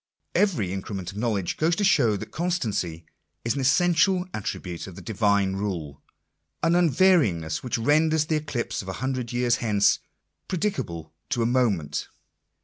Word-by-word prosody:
Every 150 - +1
increment 95 -1 -5
of 100 - -7
knowledge 105 -6 -1
goes 165 +2 +2
to 205 - -1
show 130 - +4
that - - -8
constancy 110 - -2 0.4
is 115 - +1
an 140 - -2
essential 180 +6 +3
attribute 90 -4 -5
of 95 - -10
the - - -9
Divine 100 -3 +1
rule: 85 -8 -4 0.6
an 165 +1 +3
unvaryingness 140 - +3
which 125 - -2
renders 155 +5 +3
the 155 0 +1
eclipse 145 -6 -3
of 95 - -11
a - - -3
hundred 130 +1 -3
years 120 0 +2
hence 105 -3 +2 0.5
predicable 160 - -3 0.2
to 125 -5 0
a - - +1
moment 105 - 0
120 Hz, 150 wpm, -25 LUFS, 95-155 Hz, 0.6 s, show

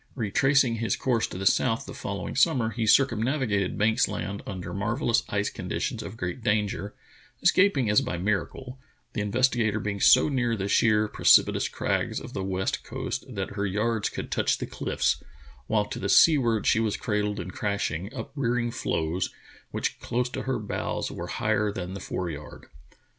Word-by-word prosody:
Retracing 130 +2 +2
his 110 -3 0
course 120 -4 0
to - - -8
the 95 - -4
south 125 +5 +2
the 135 - -8
following 100 -8 -5
summer, 130 -6 +3
he 110 0 -2
circumnavigated 120 -4 +2
Banks 110 +4 +3
Land 100 0 -4
under 95 -4 -5
marvellous 115 +4 +1
ice 100 0 -1
conditions - - -3
of 115 - -8
great 90 +6 -4
danger, 105 -1 -1 0.5
escaping 185 - +4
as 105 0 +4
by 90 - -3
miracle, 105 +7 -3 0.3
the - - -2
Investigator 110 0 +1
be 105 0 -2
ing 100 - -5
so 130 +7 +6
near 125 -5 0
the 100 -2 -3
sheer, 105 +1 +3
precipitous - - +4
crags - - -1
of - - -10
the 95 - -3
west 95 0 -2
coast 130 +1 -4
that 100 -6 -4
her 100 0 -2
yards 105 +2 0
could - - -6
touch - - +1
the - - -4
cliffs, - - -1 0.5
while 105 -2 +2
to - - -6
the 100 - -2
seaward 120 -7 +5
she 110 - +4
was 110 -2 0
cradled 105 -1 -1
in 95 - -5
crashing, 100 -3 -2
uprearing 125 -2 -2
floes 80 -3 -1 0.4
which - - -3
close 125 +1 -1
to - - -4
her 130 - +1
bows 105 -1 -3
were - - -6
higher 105 -1 0
than 95 -2 -5
the 100 - -5
foreyard. 85 -6 -6
110 Hz, 170 wpm, -27 LUFS, 100-125 Hz, 0.5 s, so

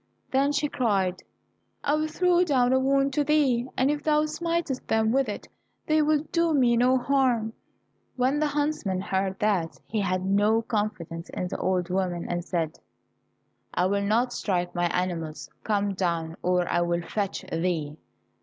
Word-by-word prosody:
Then 275 +2 +3
she 290 +1 0
cried, 200 -10 0 0.6
"I 290 - +1
will 310 +1 +1
throw 360 +2 +3
down 260 -6 +2
a 260 - +4
wand 275 +1 +2
to 295 - +2
thee, 275 -5 +2
and 265 +3 +3
if 295 0 -2
thou 305 0 +2
smitest 330 -3 -2
them 220 0 +2
with 265 -1 +2
it 205 - -6 0.4
they 310 0 +3
will 300 0 +2
do 335 -2 +2
me 245 -4 +4
no 250 +2 +4
harm." 245 -4 +1 0.6
When 260 +3 +1
the 305 - +2
huntsman 290 -10 -1
heard 190 0 -1
that, 190 -6 0
he 215 -1 -2
had 185 -1 -1
no 205 +3 +3
confidence 205 -7 -3
in 180 - -4
the - - -4
old 180 -1 0
woman, 180 -2 -1
and 175 0 -2
said, 165 -3 -2 1.0
"I 180 - +2
will 200 +2 +1
not 230 +5 +1
strike 180 -6 -1
my 175 0 +1
animals. 170 -3 -3
Come 205 -2 0
down, 170 -3 -2
or 180 -1 +1
I 175 - +1
will 170 0 0
fetch 200 +3 -3
thee." 165 -3 -1
220 Hz, 170 wpm, -26 LUFS, 180-275 Hz, 1.0 s, a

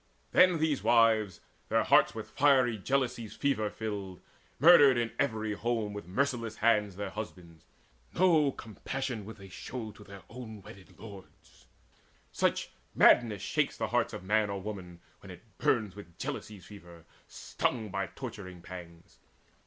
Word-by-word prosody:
Then 180 -2 +5
these 155 -3 0
wives, 110 -5 +3 0.3
Their - - +2
hearts 95 - +4
with 110 -1 -7
fiery 130 -1 +3
jealousy's 125 0 -2
fever 130 -7 0
filled, 100 -4 -6 0.4
Murdered 145 -4 +7
in 115 -1 -1
every 110 -5 -1
home 110 -1 -2
with 105 -4 -8
merciless 115 +1 -1
hands 105 -4 +2
Their 100 0 -5
husbands: 90 -6 -9 0.5
no 160 -6 +4
compassion 120 +1 -5
would 110 - -9
they 100 -1 -12
show 110 +4 -7
To 105 - -15
their 100 -1 -12
own 110 -4 -10
wedded 95 0 -14
lords 100 -4 -14 0.6
such - - 0 0.2
madness 110 -5 +5
shakes - - -1
The - - -2
heart - - +1
of - - -7
man 105 +2 +1
or 100 0 -3
woman, 95 -4 -8 0.2
when - - -14
it - - -11 0.2
burns 105 -5 +1
With 85 -5 -13
jealousy's 105 -4 -6
fever, 85 -5 -14 0.2
stung 110 -4 -3
by 100 0 -2
torturing 95 -6 -9
pangs. 85 -2 -11
110 Hz, 145 wpm, -30 LUFS, 95-120 Hz, 0.6 s, Murdered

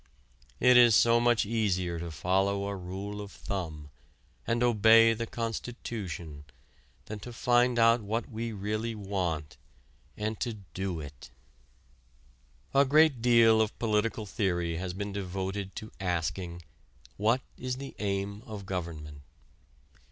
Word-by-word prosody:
It 125 0 +6
is 120 -3 +7
so 115 +2 +5
much 120 -2 +3
easier 95 -6 0
to 85 0 -5
follow 95 +5 0
a 100 0 -3
rule 95 +3 -6
of 100 -1 -8
thumb, 80 -7 -6 0.6
and 120 +1 +1
obey 115 0 +6
the 115 +1 -4
constitution, 105 -10 -5 0.6
than 105 0 -6
to 120 +4 -8
find 120 +1 +2
out 115 0 +5
what 110 +3 -2
we 115 -1 -4
really 110 +2 -3
want 90 -7 -3 0.6
and 110 +1 -3
to 120 - -2 0.2
do 95 -3 -3
it. 70 -4 -10 1.4
A 140 +1 +6
great 145 -2 +4
deal 115 -2 +5
of 110 -1 -1
political 110 -1 0
theory 85 -5 -1
has 90 +1 -4
been 100 +1 -5
devoted 95 0 -4
to 110 - -7
asking: 90 -1 -2 0.5
what 115 +5 +2
is 125 0 -4
the 135 0 -7
aim 100 0 -2
of 105 -3 -7
government? 80 -6 -5
105 Hz, 130 wpm, -29 LUFS, 90-115 Hz, 1.4 s, is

